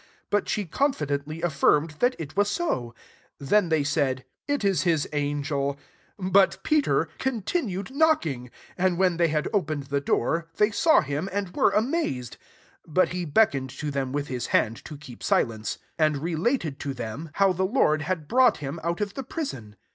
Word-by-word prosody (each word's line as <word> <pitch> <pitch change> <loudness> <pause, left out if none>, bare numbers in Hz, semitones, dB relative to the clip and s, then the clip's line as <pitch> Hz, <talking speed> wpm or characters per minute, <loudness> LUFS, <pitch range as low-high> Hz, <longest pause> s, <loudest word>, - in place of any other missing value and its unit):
But 205 0 +1
she 210 - -1
confidently 155 - -1
a^rmed 150 -1 +2
that 250 +1 +3
it 155 -4 -7
was 205 - +1
ao. 125 - -2 0.4
16 140 - -9
Then 205 -4 +4
they 160 -3 +2
said, 140 -3 0
" - - -68
It - - -8
is 195 -2 +2
his 165 -5 +2
angeL" 145 -1 -1 0.4
• 185 +1 -2
But 195 +1 +4
Peter 275 - +2
continued 225 - -2
knocking. 170 - +1 0.3
And 185 -1 +2
when 185 -2 +2
they 170 -1 +3
had 150 -1 0
opened 155 -8 0
the 140 +1 -2
doi&ry 165 +5 0
they 210 +1 +3
saw 320 +8 +4
him, 150 +6 -3
and 195 -2 -3
were - - +4
amaxcid* 215 - -1
17 - - -16 0.5
But 175 +4 +2
he 180 -1 -3
beckoned 140 -5 +2
to 150 -2 -3
then 135 -2 -2
with 145 +1 -2
his 125 -2 -3
hand 115 -1 +1
to 150 - -8
keep 135 -5 -12
silence; 110 -2 0 0.2
and 155 -2 +3
related 165 - -1
to 140 -1 -4
them 125 +7 -6
how 195 -1 +4
lie - - -1
• 180 - -11 0.2
Or, 155 - +4
ineiKng«r. 185 - 0
N. 105 -4 -12
160 Hz, 170 wpm, -26 LUFS, 140-200 Hz, 0.5 s, Then